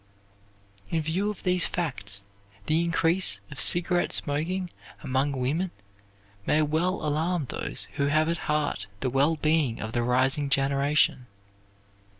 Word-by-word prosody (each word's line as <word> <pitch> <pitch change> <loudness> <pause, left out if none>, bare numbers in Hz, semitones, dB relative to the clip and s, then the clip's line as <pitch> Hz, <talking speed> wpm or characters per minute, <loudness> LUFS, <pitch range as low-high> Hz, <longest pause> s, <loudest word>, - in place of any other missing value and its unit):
In 165 - 0
view 180 +7 -1
of 210 - -7
these 180 -1 +3
facts 105 - -4 0.4
the 160 +2 +2
increase 165 - +2
of 140 - -6
cigarette 175 0 +3
smoking 175 +5 -1 0.3
among 135 +1 0
women 140 +8 -1 0.8
may 155 +1 +3
well 160 +4 0
alarm 155 +2 0
those - - -4
who 140 - +1
have 155 +2 +2
at 170 +1 0
heart 150 -9 -1
the 130 - -1
wellbeing 150 -1 +2
of 110 - -4
the 120 - 0
rising 130 +4 +1
generation. 140 -1 +2
150 Hz, 130 wpm, -27 LUFS, 135-170 Hz, 0.8 s, these